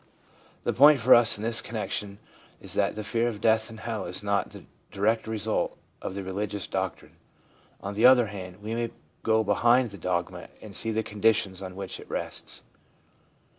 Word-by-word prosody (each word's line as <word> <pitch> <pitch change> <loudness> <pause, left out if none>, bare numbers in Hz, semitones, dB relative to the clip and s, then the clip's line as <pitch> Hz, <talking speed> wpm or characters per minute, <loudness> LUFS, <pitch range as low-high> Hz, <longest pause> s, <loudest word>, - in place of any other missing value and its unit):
The - - 0
point 145 +2 +7
for 125 +2 +6
us 115 -2 +6
in 105 - -7
this 115 0 +3
connection 105 -2 -4 0.4
is - - -4
that - - +1
the 110 - -5
fear 115 +3 0
of 110 -4 -4
death 110 0 +2
and 110 0 -10
hell 110 -4 -4
is 90 +3 -3
not 100 -1 0
the - - -11 0.3
direct 110 +3 0
result 110 -2 -1 0.2
of 95 - -5
the 100 - -4
religious 100 +1 -3
doctrine. - - -4 0.6
On 100 - -5
the 110 +5 +6
other 125 -2 +6
hand, 95 -2 -9
we 110 +2 -4
may 115 0 -1 0.3
go 110 0 +2
behind 120 +3 +3
the 100 - -10
dogma 90 0 -3
and 105 -3 -10
see 115 - +1
the 110 0 0
conditions 105 -3 +1
on 95 -1 -7
which 95 -1 -6
it - - -13
rests. - - -4
110 Hz, 185 wpm, -27 LUFS, 100-115 Hz, 0.6 s, point